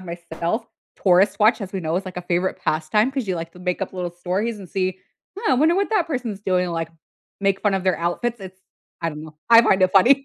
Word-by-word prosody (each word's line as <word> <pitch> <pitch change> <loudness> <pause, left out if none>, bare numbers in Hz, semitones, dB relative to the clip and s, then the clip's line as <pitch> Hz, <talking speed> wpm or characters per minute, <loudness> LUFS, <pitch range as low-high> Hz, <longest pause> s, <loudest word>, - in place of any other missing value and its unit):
myself, 170 +4 -4 0.4
tourist 190 +1 +4
watch, 215 +3 +4
as 195 -2 -6
we 190 - -3
know, 160 0 -1
is 190 - -2
like 185 - -8
a 180 - -4
favorite 180 +1 -1
pastime 165 +10 +1
'cause 265 -4 -3
you 185 - 0
like 165 0 -6
to - - -15
make 180 0 -2
up - - -4
little 180 -2 -4
stories 190 +6 -2
and 195 - -9
see, 185 0 -2 0.4
"Huh, 405 - 0
I - - +5
wonder 310 +6 +3
what 395 +3 0
that 415 -6 +2
person's 245 -9 -4
doing?" 180 -2 +1
Like, 165 -1 -3 0.5
make 195 -1 +1
fun 205 -2 +1
of 190 -1 -2
their 185 -3 +2
outfits, 220 +8 -2
it's 190 0 -10 0.4
I 165 - 0
don't 150 0 -8
know 155 -1 -12
I 230 0 +10
find 195 -4 +3
it 185 - +3
funny. 265 +8 +5
190 Hz, 245 wpm, -22 LUFS, 175-220 Hz, 0.5 s, I